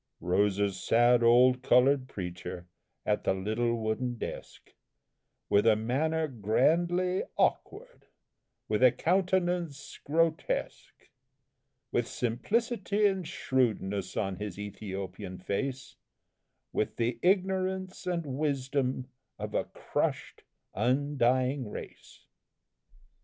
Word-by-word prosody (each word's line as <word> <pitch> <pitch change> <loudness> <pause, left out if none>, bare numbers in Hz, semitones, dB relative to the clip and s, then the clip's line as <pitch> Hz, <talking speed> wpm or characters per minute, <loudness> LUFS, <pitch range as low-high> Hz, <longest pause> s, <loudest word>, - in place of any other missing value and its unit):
Rose 95 +3 +1
a 100 -1 +1
sad, 120 +6 +3
old 125 +2 +5
coloured 130 +1 +4
preacher 90 -2 -6 0.4
at - - 0
the - - +1
little 110 +5 0
wooden 115 +2 -2
desk - - -8 0.7
With 100 +2 +3
a 110 - +6
manner 155 +9 0
grandly 170 - +1 0.2
awkward, - - -1 0.6
with 105 +1 0
a 130 -1 +7
countenance 175 -5 0
grotesque; 160 +2 -1 0.8
With 120 - 0
simplicity 210 - 0
and 190 -4 +1
shrewdness 100 -7 -1
on 95 -3 -1
his 105 -3 -5
Ethiopian 100 -2 -6
face; 130 +8 -4 0.8
With 105 - -1
the 115 0 -1
ignorance 190 0 0
and 170 -2 -1
wisdom 135 -2 -1 0.3
of - - -6
a - - 0
crushed, - - -3 0.3
undying 130 -1 +1
race. - - -10
130 Hz, 100 wpm, -30 LUFS, 110-165 Hz, 0.8 s, a